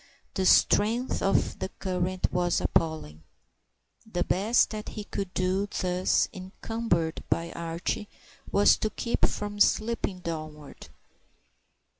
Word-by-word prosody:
The 190 -2 +1
strength 230 +8 +3
of 195 - +1
the - - -3
current 185 0 -1
was 175 -1 +2
appalling. 155 - -1 0.9
The 175 -2 0
best 210 +6 +2
that 215 -1 -5
he 210 - -6
could 195 -2 -4
do, 185 +2 +1
thus 180 -2 +1
encumbered 185 -3 -2
by 165 0 0
Archie, 170 +5 -3 0.4
was 200 +1 +5
to 215 - -1
keep 235 +2 0
from 205 0 -5
slipping 215 -2 +2
downward. 155 -3 -7
185 Hz, 115 wpm, -28 LUFS, 170-210 Hz, 0.9 s, was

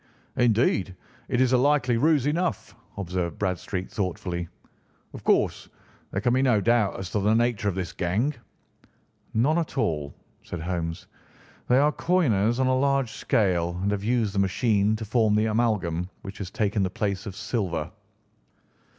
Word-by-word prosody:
"Indeed, 110 -5 +2 0.3
it 125 - +1
is 130 0 +3
a 125 - +5
likely 130 -3 +3
ruse 150 0 +3
enough," 170 +4 -1 0.2
observed 90 -4 -3
Bradstreet 95 -1 -3
thoughtfully. 90 -3 -3 0.7
"Of - - -9
course - - +1 0.4
there 95 - -2
can 120 +3 +2
be 130 - +3
no 125 -5 +3
doubt 115 -1 +2
as 90 -2 -6
to 105 - 0
the 105 +3 +2
nature 115 -3 +1
of 95 - -3
this 90 -3 -4
gang." 105 +12 0 1.0
"None 145 +9 +3
at 160 -3 -4
all," 75 - 0 0.3
said 90 - -7
Holmes. 85 -1 -3 0.6
"They 125 - +4
are 145 +2 +4
coiners 120 - +1
on 130 - +3
a 130 0 +3
large 135 -2 +1
scale, 90 -5 0
and 100 - +1
have 100 -1 -2
used 115 -2 +1
the 100 - 0
machine 100 +2 +2
to 110 0 -5
form 110 -1 +2
the 110 +1 +3
amalgam 105 -7 0
which 95 0 -8
has 95 -3 -5
taken 105 +1 0
the 95 - +1
place 100 +1 -3
of 95 - -6
silver." 95 -5 -2
105 Hz, 165 wpm, -26 LUFS, 95-125 Hz, 1.0 s, a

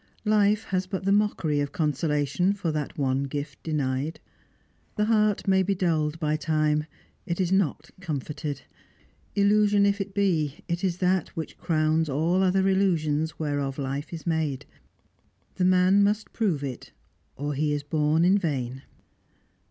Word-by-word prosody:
Life 210 0 +3
has 185 -1 -2
but 190 0 -4
the 195 - +2
mockery 200 -8 +1
of 145 -1 -1
consolation 150 +3 0
for 190 -5 -2
that 150 -2 -4
one 135 -1 0
gift 140 0 -5
denied. 145 -1 -2 0.8
The 210 - +1
heart 215 -2 +2
may 190 0 +4
be 195 +1 0
dulled 160 -4 0
by 155 -1 0
time; 155 -1 +1 0.4
it 170 0 -2
is 185 -1 0
not 170 -5 0
comforted. 150 -3 -4 0.7
Illusion 205 0 +4
if 200 0 +1
it 195 0 -6
be, 165 -8 0
it 170 +1 -2
is 180 -3 0
that 185 -1 +1
which 160 - -6
crowns 155 -1 +1
all 165 +7 +1
other 190 0 +2
illusions 160 -5 +1
whereof 145 -3 -2
life 140 +1 -4
is 165 -2 -7
made. 160 -5 -1 0.9
The 180 - +2
man 185 +2 +5
must 210 +1 0
prove 185 -11 0
it, 130 -3 -6 0.4
or 145 +2 -3
he 150 +2 0
is 145 -1 -1
born 155 +2 +2
in 195 +3 +4
vain. 135 -7 -3
160 Hz, 150 wpm, -26 LUFS, 150-190 Hz, 0.9 s, man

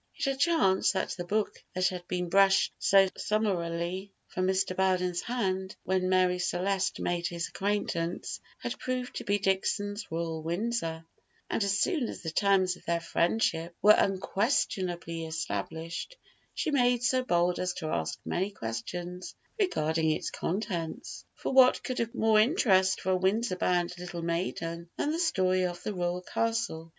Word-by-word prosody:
It - - -2
had 275 -1 -1
chanced 195 - +3
that 190 - -1
the 175 - -4
book 210 +3 -1
that 185 -1 +3
had 180 -1 -7
been 180 -1 -2
brushed 195 +1 +4
so 195 0 +5
summarily 185 -2 -1 0.2
from 185 0 -1
Mr. 190 -1 +1
Belden's 180 -2 +1
hand 190 -5 -2
when 185 0 0
Marie 185 -1 +3
Celeste 185 +2 0
made 175 0 -1
his 170 -1 -3
acquaintance 190 -4 -2 0.2
had - - -5
proved 255 -1 -3
to - - -4
be 205 +1 +1
Dixon's 205 +2 -1
"Royal 165 -1 -3
Windsor;" 165 -1 -2 0.5
and - - +1
as 200 0 +1
soon 295 - +1
as - - -8
the 160 - -3
terms 190 0 +3
of - - -19
their 170 0 +1
friendship 170 -1 0
were 210 +2 +8
unquestionably 190 - 0
established, 160 - -4 0.4
she 310 - -1
made 245 -3 +3
so 255 +1 +2
bold 175 -5 +1
as 180 -1 -1
to 160 -3 -5
ask 80 -1 -2
many 190 +3 -1
questions 175 - -6 0.2
regarding 160 - +1
its 155 - -1
contents; 175 -4 -4
for - - -3
what 260 -1 +6
could 255 - -3
have 230 0 -2
more 220 -1 +4
interest 195 - +4
for 190 - 0
a - - +4
Windsor 190 +2 +1
bound 180 -1 +1
little 175 -1 -6
maiden 170 0 -3
than 295 - 0
the 325 - -2
story 185 - +2
of 175 -1 -3
the 210 - -2
Royal 180 0 -2
Castle? 225 -8 -2
185 Hz, 160 wpm, -29 LUFS, 170-210 Hz, 0.5 s, were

